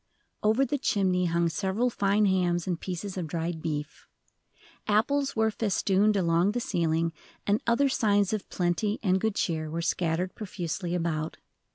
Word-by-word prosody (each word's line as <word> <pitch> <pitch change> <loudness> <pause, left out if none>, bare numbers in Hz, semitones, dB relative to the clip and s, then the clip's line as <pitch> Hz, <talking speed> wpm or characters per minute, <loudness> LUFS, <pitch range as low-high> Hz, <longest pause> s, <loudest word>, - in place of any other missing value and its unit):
Over 220 +6 +3
the 290 +1 -2
chimney 185 -6 +1
hung 170 0 +1
several 195 +8 0
fine 205 0 +2
hams 180 -3 +1
and 175 -3 -2
pieces 190 +1 -5
of 175 -3 -3
dried 165 +1 -3
beef. 150 -1 -4 0.8
Apples 275 +7 +1
were 220 0 +2
festooned 205 -1 +2
along 175 +2 +2
the 245 - 0
ceiling, 165 -5 0 0.3
and 205 +2 +2
other 235 +4 +3
signs 205 -6 +2
of 210 -3 -3
plenty 180 +4 0
and 190 -2 +2
good 220 -2 0
cheer 160 -5 -1
were 165 +2 -3
scattered 175 +1 0
profusely 180 -3 -4
about. 165 -2 -2
185 Hz, 155 wpm, -28 LUFS, 170-210 Hz, 0.8 s, Over